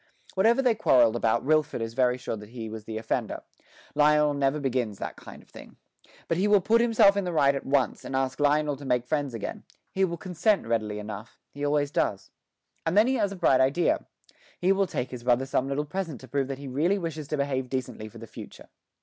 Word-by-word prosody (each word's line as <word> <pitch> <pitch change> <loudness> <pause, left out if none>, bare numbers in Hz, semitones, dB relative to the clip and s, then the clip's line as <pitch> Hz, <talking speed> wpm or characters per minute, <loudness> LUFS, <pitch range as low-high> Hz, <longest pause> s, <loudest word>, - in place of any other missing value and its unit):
Whatever 230 +7 +3
they 245 -3 +4
quarrelled 125 - +4
about 115 0 +1
Wilfred 155 0 +1
is 115 0 -4
very 125 0 +2
sure 125 -2 -4
that 105 -1 -11
he 115 -2 -7
was 110 -1 -8
the 110 0 -5
offender; 110 0 -3 0.5
Lionel 150 0 +4
never 140 +1 0
begins 125 -7 -1
that - - -5
kind - - -12
of - - -27
thing. - - -13 0.5
But 165 - 0
he 195 +3 +2
will 205 -1 +5
put 225 +5 +3
himself 225 -4 +5
in 200 - 0
the 180 - -2
right 140 -4 +3
at 140 - -5
once, 135 -4 +1
and 135 - -5
ask 135 +1 -1
Lionel 145 0 +2
to 145 - -11
make 125 -2 0
friends 145 -3 -2
again; 110 - -6 0.3
he 190 - 0
will 170 -2 0
consent 185 - 0
readily 110 -2 -1
enough 105 +1 -8
he 145 - -7
always 145 0 +1
does. 100 -9 -1 0.5
And 165 +4 0
then 215 - +7
he 260 - +1
has 205 -3 0
a - - -5
bright 130 -7 +3
idea: 140 +7 +1 0.5
he 180 +2 +3
will 195 0 +2
take 125 -6 -3
his 125 -2 -7
brother 125 +1 +2
some 135 0 0
little 145 +2 -1
present 165 -4 -4
to 130 - -11
prove 135 +1 -1
that 135 -1 -4
he 140 0 -8
really 155 +10 +1
wishes 160 -5 -5
to 150 - -2
behave 135 -2 -1
decently 125 -4 -4
for 110 - -13
the 115 - -9
future. - - -11
140 Hz, 225 wpm, -27 LUFS, 125-170 Hz, 0.5 s, then